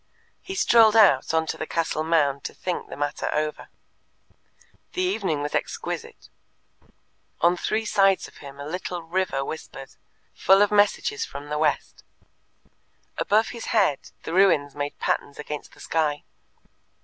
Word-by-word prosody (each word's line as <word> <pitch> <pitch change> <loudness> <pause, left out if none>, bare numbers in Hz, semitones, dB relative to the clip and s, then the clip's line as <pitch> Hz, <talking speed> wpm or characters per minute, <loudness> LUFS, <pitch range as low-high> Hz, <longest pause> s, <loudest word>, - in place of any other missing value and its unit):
He 385 - -7
strolled 225 - +5
out 195 -12 +5
on 160 0 +1
to - - -4
the 155 - -5
castle 165 -2 -1
mound 145 -4 +1
to - - -5
think 180 -1 -4
the - - -8
matter 145 0 -2
over. 150 0 -2 1.3
The 365 - -1
evening 195 - -1
was 145 - -4
exquisite. - - -4 1.1
On 175 +1 +4
three 215 +5 -1
sides 195 -2 +3
of - - -18
him 140 -1 -11
a 140 - -6
little 180 +2 -5
river 165 -5 -1
whispered, 135 -3 -8 0.4
full 195 +2 +5
of 205 - 0
messages 210 - +2
from 145 - -8
the 150 0 -2
west; 150 -2 -1 1.2
above 220 +2 +2
his 235 -2 -7
head 195 -11 +1
the 160 - -5
ruins 160 -7 +3
made 145 0 -4
patterns 140 - -2
against 150 0 -7
the - - -19
sky. 150 -3 -1
165 Hz, 150 wpm, -24 LUFS, 145-205 Hz, 1.3 s, strolled